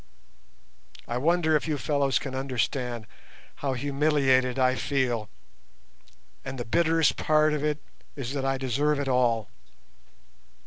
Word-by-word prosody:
I 120 - -2
wonder 160 +2 +2
if 150 - 0
you 150 -2 0
fellows 140 -1 +1
can 135 - -4
understand 125 -3 -2 0.5
how 140 -2 -2
humiliated 135 -2 +2
I 130 -1 +3
feel, 125 -5 -1 1.1
and 130 0 -6
the 120 - -4
bitterest 165 +4 +2
part 155 0 +3
of 150 -1 -2
it 150 -1 0 0.4
is 135 -2 -5
that 140 -2 -2
I 135 0 0
deserve 140 +3 0
it 140 - -2
all. 120 -4 +2
135 Hz, 130 wpm, -27 LUFS, 125-150 Hz, 1.1 s, I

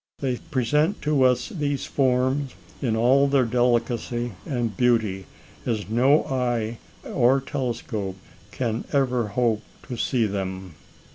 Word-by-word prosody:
They 130 -3 -1
present 150 - 0
to 150 -2 +2
us 125 -1 +3
these 145 -4 -2
forms 130 +1 +1 0.3
in 115 -5 +1
all 130 +5 +4
their 135 -2 +3
delicacy 120 0 0 0.2
and 120 -6 -1
beauty, 110 -6 +1 0.4
as 105 -5 -2
no 130 +7 +4
eye 120 -4 -1 0.2
or 130 +1 +3
telescope 115 -7 -3 0.3
can 115 +1 -2
ever 125 -5 +2
hope 110 0 +1 0.3
to 125 - -4
see 120 -1 +1
them." 95 -3 -4
125 Hz, 125 wpm, -24 LUFS, 115-135 Hz, 0.4 s, all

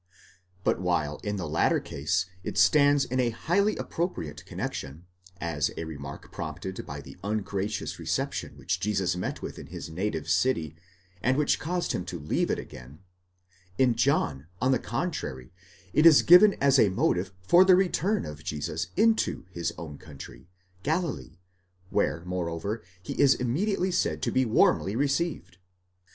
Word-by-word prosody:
But - - +1
while 75 -5 0
in 105 -1 -4
the 90 -5 -4
latter 80 +2 +2
case 80 +6 -1 0.2
it - - -5
stands 145 -2 +5
in 130 +1 -2
a 125 -2 +3
highly 195 - +1
appropriate 170 - -4
connexion, 75 +6 -5 0.3
as 80 -3 -1
a - - -3
remark 70 -3 -8
prompted 95 0 -5
by - - -6
the - - -12
ungracious 100 0 -3
reception - - -3
which 90 -1 -2
Jesus 95 -2 0
met 90 - -4
with - - -6
in - - -10
his - - -8
native 90 -1 -3
city, 85 - +1 0.5
and 130 +2 +2
which 150 -1 +2
caused 175 +2 -2
him 90 - -2
to 90 - -5
leave 75 -1 -1
it - - +1
again: 65 +5 -10 0.8
in 130 -2 +4
John, 110 - +1
on 130 +2 +2
the 130 - +3
contrary, 65 - -4 0.4
it 155 +2 +6
is 155 -3 +7
given 195 +4 +8
as 140 -1 +3
a 105 - +5
motive 95 0 0
for 175 - +6
the 190 -1 +6
return 190 +2 +1
of 75 0 -8
Jesus 80 +1 -3
into 220 - +2
his 85 -2 -2
own 80 -3 -8
country, 70 -2 -12 0.3
Galilee, 160 - -2 0.5
where, 80 +5 0
moreover, 90 +4 -3 0.2
he - - -5
is 140 -2 +6
immediately 185 - 0
said 180 - 0
to - - 0
be 130 0 +2
warmly 105 -2 +3
received. 140 - -1
100 Hz, 155 wpm, -27 LUFS, -, 0.8 s, given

